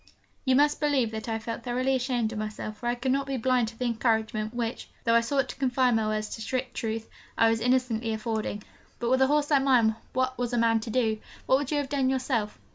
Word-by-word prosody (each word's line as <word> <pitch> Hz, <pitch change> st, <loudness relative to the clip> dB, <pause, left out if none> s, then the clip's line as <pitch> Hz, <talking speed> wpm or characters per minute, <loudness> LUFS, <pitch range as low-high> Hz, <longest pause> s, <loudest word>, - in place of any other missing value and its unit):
You 260 Hz, -1 st, +4 dB
must 295 Hz, +2 st, +3 dB
believe 280 Hz, -7 st, +1 dB
that 220 Hz, +1 st, -5 dB
I 225 Hz, -, 0 dB
felt 225 Hz, +1 st, -5 dB
thoroughly 255 Hz, +2 st, 0 dB
ashamed 245 Hz, -3 st, 0 dB
of 215 Hz, -, -4 dB
myself, 215 Hz, 0 st, -5 dB
for 240 Hz, -, -4 dB
I 240 Hz, -, +1 dB
could 255 Hz, +2 st, -1 dB
not 275 Hz, +1 st, 0 dB
be 270 Hz, -1 st, -2 dB
blind 250 Hz, -1 st, +2 dB
to 225 Hz, 0 st, -9 dB
the 250 Hz, -, -2 dB
encouragement 220 Hz, -2 st, 0 dB
which, 235 Hz, -1 st, -4 dB
though 230 Hz, -, +2 dB
I 230 Hz, -, +6 dB
sought 270 Hz, +3 st, 0 dB
to -, -, -6 dB
confine 255 Hz, -2 st, +2 dB
my 220 Hz, -1 st, +1 dB
words 215 Hz, 0 st, -1 dB
to 225 Hz, -, -6 dB
strict 255 Hz, +3 st, -3 dB
truth, 225 Hz, 0 st, -3 dB, 0.3 s
I 225 Hz, 0 st, +5 dB
was 225 Hz, -, 0 dB
innocently 240 Hz, -2 st, +1 dB
affording. 220 Hz, -2 st, -3 dB, 0.3 s
But, 235 Hz, 0 st, -1 dB
with 260 Hz, 0 st, +3 dB
a 265 Hz, -, +6 dB
horse 295 Hz, +1 st, +1 dB
like 280 Hz, -2 st, +5 dB
mine, 240 Hz, -5 st, +4 dB, 0.2 s
what 255 Hz, -1 st, 0 dB
was 245 Hz, 0 st, -1 dB
a -, -, +1 dB
man 230 Hz, -1 st, +3 dB
to 220 Hz, -, -7 dB
do? 220 Hz, -2 st, +1 dB, 0.3 s
What 260 Hz, -, +4 dB
would 285 Hz, -2 st, -4 dB
you 300 Hz, -, 0 dB
have 285 Hz, -1 st, -1 dB
done 270 Hz, -2 st, +1 dB
yourself? 255 Hz, -5 st, -1 dB
240 Hz, 245 wpm, -27 LUFS, 225-260 Hz, 0.3 s, I